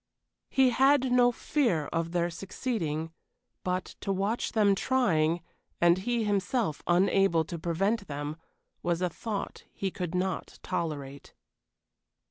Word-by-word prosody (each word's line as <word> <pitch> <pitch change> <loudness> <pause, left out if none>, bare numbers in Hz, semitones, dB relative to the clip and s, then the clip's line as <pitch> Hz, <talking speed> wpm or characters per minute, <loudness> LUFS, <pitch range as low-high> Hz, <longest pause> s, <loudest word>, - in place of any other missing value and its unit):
He 265 -2 +4
had 265 +1 +4
no 245 0 +5
fear 235 - 0
of 165 0 -1
their 175 0 0
succeeding, 165 - -3 0.5
but, 185 0 -1 0.2
to 195 - -1
watch 200 +5 -1
them 210 -3 +4
trying, 175 -9 +2 0.4
and 175 +1 +5
he 235 +3 0
himself 205 - 0
unable 175 -2 +3
to 170 +1 -6
prevent 195 +6 0
them, 145 +1 -4 0.5
was 175 +1 0
a 180 - +2
thought 215 -4 -5
he 195 -1 -3
could 180 -2 -4
not 185 +1 -2
tolerate. 140 -4 -4
185 Hz, 125 wpm, -29 LUFS, 165-225 Hz, 0.5 s, no